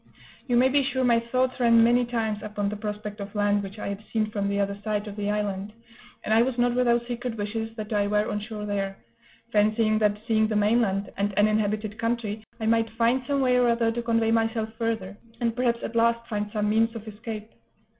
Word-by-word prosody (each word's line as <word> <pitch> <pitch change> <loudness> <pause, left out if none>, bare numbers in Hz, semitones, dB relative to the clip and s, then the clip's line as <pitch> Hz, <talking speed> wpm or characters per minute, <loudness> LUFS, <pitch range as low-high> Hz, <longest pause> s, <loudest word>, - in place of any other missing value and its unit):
You 245 -2 +2
may 255 +2 +5
be 280 +2 +3
sure 260 -1 -1
my 235 -2 +4
thoughts 255 +3 -1
ran 230 -2 +6
many 240 +1 +4
times 225 -3 -2
upon 210 -1 -2
the 210 - -4
prospect 210 0 -5
of 200 +1 -7
land 205 0 +2
which 200 +1 -8
I 210 - -4
had 200 +1 -5
seen 215 -1 0
from 200 -1 -1
the 200 0 0
other 200 0 0
side 210 -1 -2
of 205 - -7
the 205 -1 -2
island; 205 -1 -2 0.5
and 215 - 0
I 225 - +6
was 250 0 0
not 245 0 +2
without 240 -1 +2
secret 240 -1 -4
wishes 220 +2 -4
that 215 -1 -5
I 205 -1 +2
were 210 +1 +1
on 210 - -2
shore 210 0 -6
there, 195 -1 -2 0.5
fancying 215 +1 +3
that, 210 -1 +2
seeing 220 -2 +3
the 215 - -2
mainland, 205 -2 +2
and 200 0 -1
an 205 +1 +5
inhabited 215 0 -1
country, 230 -2 -2 0.2
I 220 - -3
might 225 0 +2
find 230 +3 +1
some 280 -1 +1
way 250 -1 +3
or 245 -1 +4
other 230 -1 +2
to 240 +1 -3
convey 230 -1 +1
myself 225 -1 +1
further, 225 -4 -2 0.2
and 230 -1 0
perhaps 240 -2 0
at 230 - -5
last 235 0 +2
find 210 -2 -2
some 210 -1 0
means 225 +2 +2
of 225 -1 -8
escape. 215 0 -7
220 Hz, 225 wpm, -26 LUFS, 210-235 Hz, 0.5 s, ran